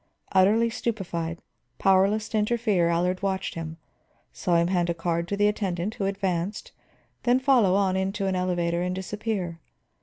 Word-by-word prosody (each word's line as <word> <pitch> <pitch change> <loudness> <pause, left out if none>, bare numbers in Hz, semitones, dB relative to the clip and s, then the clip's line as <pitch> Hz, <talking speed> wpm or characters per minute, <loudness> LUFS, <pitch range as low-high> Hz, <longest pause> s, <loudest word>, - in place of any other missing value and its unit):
Utterly 215 +5 +4
stupefied, 175 -8 -3 0.3
powerless 195 +3 +3
to 220 - -1
interfere, 210 -5 +1
Allard 180 +2 0
watched 195 -1 -1
him; 165 -1 -6 0.6
saw 175 - 0
him 170 0 +4
hand 175 -2 +1
a 170 - 0
card 170 0 -1
to 200 - -2
the 205 0 +4
attendant 195 -2 -1
who 200 - -3
advanced, 195 -1 -2 0.5
then 245 +1 +3
follow 250 -8 +4
on 195 -2 +2
into 195 +1 -1
an 190 -1 0
elevator 175 -2 0
and 180 +1 -1
disappear. 190 -3 -3
190 Hz, 155 wpm, -26 LUFS, 175-210 Hz, 0.6 s, Utterly